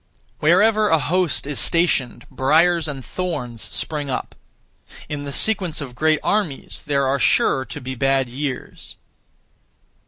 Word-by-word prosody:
Wherever 210 Hz, +7 st, +4 dB
a 160 Hz, -, +4 dB
host 155 Hz, -2 st, 0 dB
is 145 Hz, -2 st, -2 dB
stationed, 135 Hz, -8 st, +1 dB
briars 160 Hz, +6 st, +3 dB
and 135 Hz, -4 st, -6 dB
thorns 125 Hz, -11 st, -4 dB
spring 150 Hz, -3 st, -2 dB
up. 130 Hz, -, -4 dB, 0.7 s
In 145 Hz, -1 st, -5 dB
the 140 Hz, -, -5 dB
sequence 185 Hz, -2 st, +1 dB
of 135 Hz, -4 st, -7 dB
great 155 Hz, +4 st, +2 dB
armies 200 Hz, -10 st, -2 dB
there 140 Hz, -2 st, +1 dB
are 135 Hz, +1 st, +1 dB
sure 130 Hz, 0 st, +2 dB
to -, -, -7 dB
be 130 Hz, 0 st, -6 dB
bad 135 Hz, 0 st, +1 dB
years. 130 Hz, +1 st, -6 dB
145 Hz, 135 wpm, -21 LUFS, 130-170 Hz, 0.7 s, Wherever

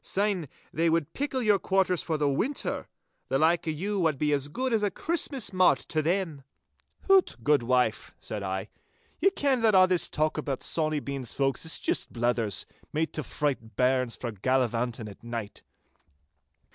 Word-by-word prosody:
Syne 195 Hz, -5 st, 0 dB, 0.3 s
they 165 Hz, +2 st, +2 dB
would 165 Hz, -2 st, 0 dB
pickle 270 Hz, -2 st, -2 dB
your 210 Hz, -3 st, +4 dB
quarters 190 Hz, -2 st, +2 dB
for 160 Hz, -2 st, -1 dB
the 150 Hz, -1 st, +1 dB
winter. 215 Hz, -, -1 dB, 0.4 s
The 135 Hz, -, +1 dB
like 165 Hz, +3 st, +2 dB
o' -, -, +2 dB
you 195 Hz, +7 st, -2 dB
wad 160 Hz, -5 st, +2 dB
be 150 Hz, +1 st, +1 dB
as 140 Hz, -1 st, +1 dB
guid 255 Hz, -, -2 dB
as 220 Hz, -, +2 dB
a 205 Hz, -, +2 dB
Christmas 280 Hz, -, -2 dB
mart 185 Hz, -1 st, +5 dB
to 155 Hz, -, +1 dB
them.' 165 Hz, -3 st, -1 dB, 0.6 s
'Hoot, 390 Hz, -1 st, +4 dB
good 145 Hz, 0 st, +4 dB
wife,' 125 Hz, -2 st, 0 dB
said 105 Hz, -, -5 dB
I, 95 Hz, 0 st, -3 dB, 0.5 s
'ye 390 Hz, -, +5 dB
ken 280 Hz, -9 st, +1 dB
that 220 Hz, -3 st, +4 dB
a' 185 Hz, 0 st, +8 dB
this 185 Hz, -2 st, +1 dB
talk 155 Hz, +1 st, 0 dB
aboot 140 Hz, -3 st, -3 dB
Sawny 155 Hz, -2 st, 0 dB
Bean's 135 Hz, -4 st, -4 dB
folk 135 Hz, -1 st, 0 dB
is 160 Hz, -, -3 dB
juist -, -, -1 dB
blethers—made 120 Hz, +6 st, -2 dB
to 155 Hz, -, -2 dB
fright 135 Hz, -7 st, -3 dB
bairns 130 Hz, -1 st, +2 dB
frae 120 Hz, -, -4 dB
gallivanting 120 Hz, +1 st, 0 dB
at 100 Hz, -, -12 dB
night. 115 Hz, -3 st, -6 dB
155 Hz, 170 wpm, -28 LUFS, 130-190 Hz, 0.6 s, a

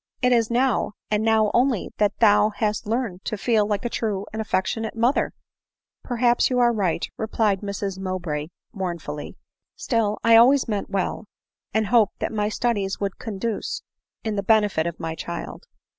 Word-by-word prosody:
It 250 Hz, -, +4 dB
is 230 Hz, -2 st, +2 dB
now, 240 Hz, -3 st, +1 dB, 0.2 s
and 210 Hz, 0 st, +2 dB
now 220 Hz, -1 st, +3 dB
only 245 Hz, -4 st, +1 dB
that 210 Hz, -1 st, +2 dB
thou 210 Hz, -1 st, +5 dB
hast 210 Hz, -1 st, -2 dB
learned 220 Hz, -5 st, -2 dB
to 215 Hz, -, -2 dB
feel 215 Hz, 0 st, +2 dB
like 205 Hz, +1 st, -2 dB
a -, -, +2 dB
true 205 Hz, -4 st, -2 dB
and 220 Hz, -, -2 dB
affectionate 220 Hz, +2 st, -1 dB
mother! 240 Hz, +5 st, +2 dB, 0.4 s
" -, -, -68 dB, 0.3 s
"Perhaps 240 Hz, -1 st, +2 dB
you 250 Hz, -, 0 dB
are 240 Hz, -1 st, +4 dB
right," 185 Hz, -6 st, 0 dB
replied 215 Hz, -3 st, 0 dB
Mrs 200 Hz, -1 st, -4 dB
Mowbray 175 Hz, -6 st, -3 dB, 0.3 s
mourn 185 Hz, -4 st, -3 dB
fully, 150 Hz, -2 st, -7 dB, 0.2 s
" -, -, -64 dB
still, 220 Hz, -3 st, 0 dB
I 230 Hz, 0 st, +7 dB
always 255 Hz, +4 st, +5 dB
meant 210 Hz, -3 st, -2 dB
well; 195 Hz, +2 st, -2 dB, 0.5 s
and 220 Hz, +1 st, +1 dB
hoped 220 Hz, -1 st, +3 dB
that -, -, -3 dB
my 210 Hz, -1 st, 0 dB
studies 205 Hz, -4 st, -1 dB
would 200 Hz, -2 st, -3 dB
conduce 220 Hz, 0 st, -3 dB, 0.4 s
to 220 Hz, -, -2 dB
the 205 Hz, -1 st, -1 dB
benefit 205 Hz, -5 st, +2 dB
of 170 Hz, -, -5 dB
my 160 Hz, -, -3 dB
child." 170 Hz, -, -6 dB
215 Hz, 175 wpm, -24 LUFS, 195-230 Hz, 0.5 s, I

